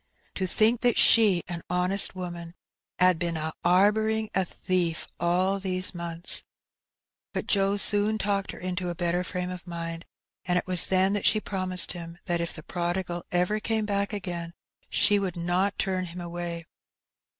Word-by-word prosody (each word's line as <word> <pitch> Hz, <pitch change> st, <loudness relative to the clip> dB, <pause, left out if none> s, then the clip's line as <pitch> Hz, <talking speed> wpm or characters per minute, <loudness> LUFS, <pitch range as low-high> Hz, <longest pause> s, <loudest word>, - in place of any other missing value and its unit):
'^To 185 Hz, -1 st, -3 dB
think 225 Hz, +5 st, +2 dB
that 245 Hz, -1 st, +2 dB
she, 205 Hz, -6 st, +6 dB
a 170 Hz, 0 st, -5 dB
honest 180 Hz, +2 st, +2 dB
woman, 175 Hz, -2 st, -7 dB, 0.4 s
'ad 180 Hz, -2 st, +3 dB
been 170 Hz, -1 st, -2 dB
a 160 Hz, 0 st, -4 dB
'arbouring 215 Hz, +4 st, +2 dB
a 190 Hz, -, +2 dB
thief 175 Hz, -2 st, -2 dB
all 185 Hz, +3 st, +1 dB
these 185 Hz, -1 st, -1 dB
months! 170 Hz, 0 st, 0 dB, 0.4 s
" -, -, -64 dB
But -, -, -2 dB
Joe 200 Hz, 0 st, +1 dB
soon 205 Hz, +1 st, +3 dB
talked 200 Hz, -2 st, -1 dB
her -, -, -6 dB
into 180 Hz, 0 st, -4 dB
a 175 Hz, -, -4 dB
better 175 Hz, +1 st, -1 dB
fi*ame 180 Hz, -1 st, -4 dB
of 180 Hz, -1 st, -9 dB
mind, 165 Hz, 0 st, -6 dB, 0.4 s
and 180 Hz, 0 st, 0 dB
it -, -, -1 dB
was 180 Hz, -2 st, +5 dB
then 190 Hz, +1 st, +3 dB
that 205 Hz, -, +1 dB
she 215 Hz, -, +4 dB
promised 185 Hz, -3 st, +2 dB
him 170 Hz, -1 st, -8 dB
that 175 Hz, -3 st, +1 dB
if 170 Hz, -, -2 dB
the 155 Hz, -, -9 dB
prodigal 175 Hz, 0 st, -3 dB
ever 180 Hz, +4 st, +1 dB
came 220 Hz, 0 st, -1 dB
back 200 Hz, -1 st, -1 dB
again 175 Hz, -4 st, -5 dB, 0.3 s
she 205 Hz, 0 st, +4 dB
would 185 Hz, -3 st, -3 dB
not 180 Hz, +3 st, 0 dB
turn 185 Hz, -1 st, -1 dB
him 175 Hz, +1 st, -8 dB
away. 170 Hz, -1 st, -5 dB
180 Hz, 175 wpm, -26 LUFS, 175-200 Hz, 0.4 s, she